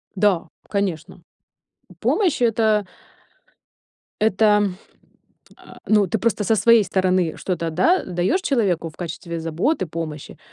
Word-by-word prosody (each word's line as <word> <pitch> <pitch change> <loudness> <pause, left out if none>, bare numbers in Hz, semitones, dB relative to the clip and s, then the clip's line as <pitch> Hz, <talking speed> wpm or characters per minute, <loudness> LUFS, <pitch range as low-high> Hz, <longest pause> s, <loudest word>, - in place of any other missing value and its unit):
Да, 190 -4 +1 0.2
конечно. 185 -3 -3 0.8
Помощь- 370 -11 +1
это 220 -3 +2 1.4
это, 210 -1 +3 0.9
а, - - -15
ну, 210 -2 +3
ты 220 - -1
просто 220 0 0
со 220 +2 +2
своей 230 0 +5
стороны 185 -3 0
что-то, 170 -3 -3
да, 330 - +2
даёшь 180 - -1
человеку 195 - 0
в 155 - -16
качестве 170 0 -6
заботы, 175 - -1
помощи, 160 -2 -7
195 Hz, 115 wpm, -21 LUFS, 170-220 Hz, 1.4 s, своей